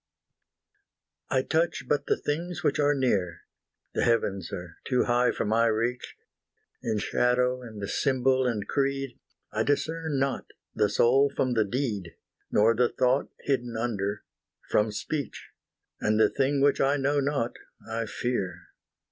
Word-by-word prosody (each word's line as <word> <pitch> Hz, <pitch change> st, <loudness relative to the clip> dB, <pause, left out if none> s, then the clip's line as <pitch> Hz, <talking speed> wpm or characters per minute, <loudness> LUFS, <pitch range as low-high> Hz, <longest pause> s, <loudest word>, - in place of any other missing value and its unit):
I 130 Hz, -1 st, +2 dB
touch 165 Hz, +4 st, 0 dB
but 145 Hz, -, 0 dB
the -, -, +2 dB
things 175 Hz, +4 st, -3 dB
which 145 Hz, -2 st, +1 dB
are 145 Hz, 0 st, +3 dB
near; 95 Hz, -11 st, 0 dB, 0.5 s
The -, -, 0 dB
heavens 100 Hz, -6 st, +1 dB
are 90 Hz, -4 st, -7 dB
too 125 Hz, -1 st, +2 dB
high 120 Hz, 0 st, +3 dB
for -, -, -1 dB
my 115 Hz, +2 st, +3 dB
reach: 115 Hz, +3 st, -1 dB, 0.7 s
In 110 Hz, -, -1 dB
shadow 125 Hz, +3 st, +1 dB
and 110 Hz, -4 st, -7 dB
symbol 130 Hz, +1 st, +2 dB
and 110 Hz, -4 st, -2 dB
creed, 135 Hz, -2 st, -1 dB, 0.3 s
I -, -, -1 dB
discern 160 Hz, +1 st, 0 dB
not 135 Hz, 0 st, -1 dB, 0.3 s
the 105 Hz, -, +2 dB
soul 130 Hz, +7 st, +4 dB
from 130 Hz, -2 st, +1 dB
the 110 Hz, -2 st, +2 dB
deed, 105 Hz, -6 st, -3 dB, 0.3 s
Nor 110 Hz, +2 st, +4 dB
the 120 Hz, +1 st, +2 dB
thought 130 Hz, +2 st, +1 dB
hidden 120 Hz, -4 st, -1 dB
under, 105 Hz, -3 st, -2 dB, 0.5 s
from 105 Hz, +1 st, +3 dB
speech; 145 Hz, +7 st, -4 dB, 0.5 s
And 110 Hz, +1 st, +1 dB
the -, -, +5 dB
thing 135 Hz, +1 st, +1 dB
which 140 Hz, 0 st, +3 dB
I 140 Hz, +2 st, +3 dB
know 145 Hz, +1 st, +1 dB
not 135 Hz, -4 st, -1 dB, 0.3 s
I 115 Hz, 0 st, -3 dB
fear. 95 Hz, -8 st, -3 dB
125 Hz, 145 wpm, -27 LUFS, 110-140 Hz, 0.7 s, the